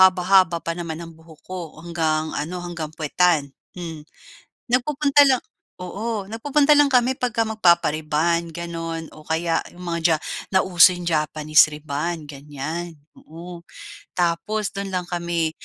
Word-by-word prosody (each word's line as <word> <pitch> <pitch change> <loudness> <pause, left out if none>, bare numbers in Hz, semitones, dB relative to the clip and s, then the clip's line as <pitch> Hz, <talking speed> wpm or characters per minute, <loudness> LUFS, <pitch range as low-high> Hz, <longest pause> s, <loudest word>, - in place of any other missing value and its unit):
haba-haba 185 -1 +5
pa 165 - 0
naman 160 -2 -5
ang 165 -1 -9
buhok 160 -1 -17
ko 185 0 -5 0.2
hanggang 160 -2 0 0.2
ano, 175 +4 -5
hanggang 170 -3 -5
puwetan, 165 +1 +2 0.4
hmm. 165 -3 -6 0.7
Nagpupunta 285 +3 +4
lang 255 - +3 0.4
oo 205 +3 -4
nagpupunta 290 +5 +3
lang 290 -1 +5
kami 250 +2 +3
'pagka 235 -3 -1
magpapa-rebond, 170 -3 +2
gano'n, 165 0 -5
o 155 - -13
kaya 165 +1 +1
'yong 180 +1 -12
mga 170 0 -2
ja 160 - +4 0.4
nauso 185 -1 +6
'yong 175 -1 -7
Japanese 155 -1 +3
rebond, 150 +2 -4
ganyan. 150 +4 -6 0.2
Oo, 170 +2 -11 0.5
tapos 180 +5 0
do'n 195 -1 -5
lang 180 - -1
kami 170 -2 -1
170 Hz, 135 wpm, -22 LUFS, 160-190 Hz, 0.7 s, nauso